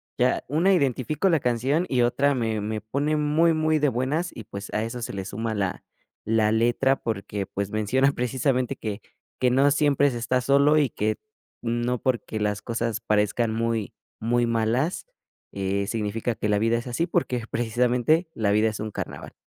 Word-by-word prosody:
ya 125 0 +1
una 165 +8 +3
identifico 145 - +1
la 165 -3 +3
canción 130 +8 0
y 125 -2 +2
otra 140 +4 +2
me 110 -3 -1
me 105 +1 -3
pone 140 +8 -1
muy, 155 +3 +3
muy 155 0 +2
de 150 -1 +3
buenas 135 +8 -1
y 115 - -9
pues 100 -1 -8
a 105 - +1
eso 115 +2 -5
se 115 - -4
le 95 -1 -4
suma 110 +3 -3
la 95 -3 -2 0.4
la 110 -1 +2
letra 120 +4 +2
porque 100 -2 -3
pues 100 0 -4
menciona 125 +6 +2
precisamente 125 0 0
que 105 -1 -5 0.4
que 125 - +3
no 135 +3 +4
siempre 145 -1 +3
se 120 - -4
está 125 +2 +1
solo 140 +4 +4
y 145 -4 +3
que 110 +1 -1 0.5
no 120 +1 -1
porque 120 -4 -1
las 105 -1 -1
cosas 115 -1 -2
parezcan 105 +2 +1
muy 115 -2 -1 0.3
muy 120 +2 +1
malas, 115 +8 0 0.5
eh, 100 0 -1
significa 110 +2 -2
que 105 - -2
la 105 - +3
vida 115 +2 +2
es 120 - -6
así 125 +7 0
porque 130 -9 -1
precisamente 125 +7 +1
la 105 -2 0
vida 105 +2 +3
es 110 - -6
un 110 0 -4
carnaval. - - -6
120 Hz, 180 wpm, -25 LUFS, 110-140 Hz, 0.5 s, no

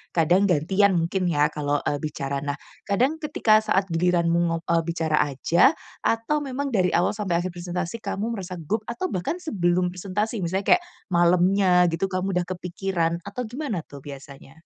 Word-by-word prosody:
kadang 175 +5 +4
gantian 190 +4 +3
mungkin 175 +2 0
ya, 150 -3 +2
kalau, 145 -1 -1
eee, 145 - -1
bicara. 140 -2 -3
Nah, 145 0 -3 0.3
kadang 255 +10 +1
ketika 240 -8 +3
saat 200 -2 +1
giliranmu 170 0 +2
ngop 165 0 -1
eee, 170 0 +2
bicara 160 -2 0
aja 170 - +3 0.2
atau 230 +7 0
memang 275 -1 -3
dari 185 -5 +2
awal 175 - +3
sampai 205 -4 -2
akhir 185 - -3
presentasi 175 +3 -4
kamu 210 +2 -3
merasa 185 -4 -5
gugup 175 +7 -2
atau 235 +10 -3
bahkan 180 - -2
sebelum 180 - +1
presentasi 205 +5 -3
misalnya 190 +2 +2
kayak, 360 - -4 0.3
malamnya 180 +1 +4
gitu 170 +4 -1
kamu 190 +1 -2
udah 175 - -2
kepikiran 180 -2 -2
atau 250 +5 -4
gimana 240 - -4
tuh 140 - -12
biasanya? 140 +2 -12
180 Hz, 165 wpm, -24 LUFS, 165-205 Hz, 0.3 s, kadang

